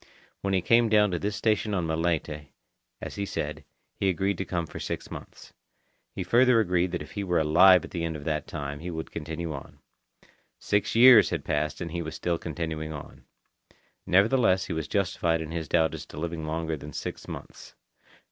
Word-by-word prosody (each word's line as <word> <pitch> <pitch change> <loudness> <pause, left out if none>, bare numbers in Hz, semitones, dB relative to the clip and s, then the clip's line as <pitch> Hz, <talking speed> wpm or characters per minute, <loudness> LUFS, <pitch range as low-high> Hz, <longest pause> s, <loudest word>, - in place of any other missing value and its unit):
When 100 -1 0
he 90 - +1
came 115 0 +4
down 105 -2 +4
to 90 - -1
this 100 +2 -2
station 105 -1 0
on 90 -3 0
Malaita, 80 -2 -1 0.5
as - - -7
he 100 - -1
said, 75 -2 -4 0.3
he 95 - 0
agreed 95 +1 0
to 95 - -2
come 85 -2 -2
for - - -9
six - - -5
months. - - -10 0.6
He 95 - -3
further 120 +5 +4
agreed 90 -3 +1
that 90 - -2
if - - -14
he 100 - -4
were 90 -2 0
alive 90 +4 +6
at - - -13
the 85 -2 -3
end 80 -1 -2
of 75 - -7
that 75 -1 -2
time, 75 -1 -5
he 85 +3 -6
would 80 -2 -5
continue 80 +1 -5
on. 70 - -9 0.8
Six 105 +2 0
years 120 -1 +8
had - - -3
passed 75 +2 -1
and 85 -2 -4
he 85 0 -3
was 80 -1 -6
still 85 -2 -1
continuing 80 -1 -4
on. 75 -2 -10 0.8
Nevertheless 100 0 +3
he 90 - -4
was 80 -1 -3
justified 85 -4 0
in 80 -1 -6
his 80 -1 -4
doubt 80 -2 +2
as 80 - -7
to - - -12
living 80 -1 -4
longer 80 0 -2
than 75 0 -9
six - - -6
months. - - -10
85 Hz, 200 wpm, -27 LUFS, 80-95 Hz, 0.8 s, years